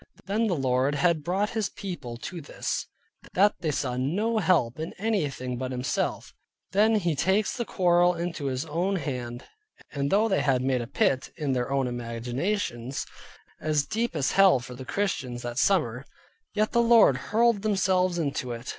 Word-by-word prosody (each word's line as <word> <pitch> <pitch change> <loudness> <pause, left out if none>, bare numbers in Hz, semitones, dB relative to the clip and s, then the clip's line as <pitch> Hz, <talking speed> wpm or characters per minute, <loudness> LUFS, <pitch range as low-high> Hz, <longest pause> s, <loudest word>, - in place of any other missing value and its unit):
When 215 +4 +1
the 185 - +1
Lord 130 0 +1
had 160 +1 +2
brought 195 +5 0
His 220 -3 -1
people 145 - -6
to 170 +8 -7
this, 145 - -4 0.5
that 205 +3 +5
they 160 - -1
saw 130 -3 -1
no 205 - 0
help 155 - +2
in 160 +2 -4
anything 150 - -2
but 130 +1 -3
Himself; 125 0 -2 0.4
then 215 +3 +4
He 175 -6 +1
takes 190 +8 +1
the 235 - -2
quarrel 175 -2 +3
into 170 -3 -4
His 130 +2 -2
own 175 +6 -1
hand; 125 -6 -4 0.5
and 140 -1 -1
though 210 +3 +4
they 195 - +1
had 130 -3 +2
made 130 -2 +1
a 120 - -5
pit, 130 0 +1
in 145 -5 -1
their 125 -1 -1
own 135 -1 +1
imaginations, 120 - -3 0.5
as 150 -2 +1
deep 225 0 -2
as 140 -4 +1
hell 195 -8 +6
for 125 +1 -9
the 130 +1 -9
Christians 130 -10 -2
that 120 +1 -3
summer, 130 - +2 0.5
yet 215 +1 +1
the 235 - +3
Lord 230 - +6
hurled 230 -1 +3
themselves 190 -3 +1
into 140 -6 -2
it. 115 +2 -7
155 Hz, 175 wpm, -27 LUFS, 130-195 Hz, 0.5 s, hell